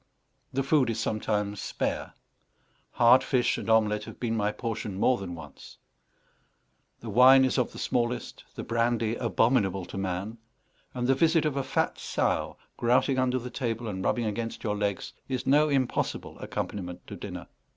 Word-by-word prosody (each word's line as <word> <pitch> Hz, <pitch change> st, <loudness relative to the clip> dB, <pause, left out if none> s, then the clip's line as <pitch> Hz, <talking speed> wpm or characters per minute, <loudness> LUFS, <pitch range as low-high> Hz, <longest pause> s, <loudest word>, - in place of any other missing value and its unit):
The 135 Hz, +1 st, 0 dB
food 135 Hz, -3 st, +3 dB
is 115 Hz, -1 st, -2 dB
sometimes 105 Hz, -2 st, -1 dB
spare; -, -, -3 dB, 0.8 s
hard 120 Hz, +2 st, +6 dB
fish 125 Hz, -3 st, +1 dB
and -, -, -6 dB
omelette 105 Hz, -1 st, +3 dB
have -, -, -11 dB
been 115 Hz, -2 st, -1 dB
my 105 Hz, -1 st, +1 dB
portion 110 Hz, -4 st, -4 dB
more 125 Hz, +4 st, +3 dB
than 90 Hz, -3 st, -6 dB
once; 80 Hz, -4 st, -12 dB, 1.2 s
the -, -, -7 dB
wine 130 Hz, +2 st, +7 dB
is 130 Hz, -, +1 dB
of 125 Hz, -, 0 dB
the -, -, -11 dB
smallest, 120 Hz, 0 st, -2 dB
the -, -, -5 dB
brandy 115 Hz, -1 st, 0 dB
abominable 115 Hz, -6 st, +1 dB
to 95 Hz, -, -6 dB
man; 95 Hz, +4 st, -3 dB, 0.6 s
and 125 Hz, -1 st, -1 dB
the 135 Hz, -, +4 dB
visit 165 Hz, +3 st, +3 dB
of 150 Hz, -3 st, 0 dB
a 140 Hz, -, 0 dB
fat -, -, -1 dB
sow, -, -, -1 dB, 0.2 s
grouting 125 Hz, +3 st, +2 dB
under 130 Hz, 0 st, +1 dB
the 125 Hz, 0 st, -6 dB
table 115 Hz, -3 st, -3 dB
and 95 Hz, -3 st, -4 dB
rubbing 120 Hz, +2 st, 0 dB
against 115 Hz, +2 st, -4 dB
your 105 Hz, -2 st, -1 dB
legs, 100 Hz, -1 st, -2 dB, 0.2 s
is 130 Hz, -2 st, -2 dB
no 150 Hz, +3 st, +4 dB
impossible 135 Hz, -3 st, -1 dB
accompaniment 90 Hz, -3 st, -5 dB
to -, -, -8 dB
dinner. -, -, -7 dB
115 Hz, 165 wpm, -28 LUFS, 105-130 Hz, 1.2 s, wine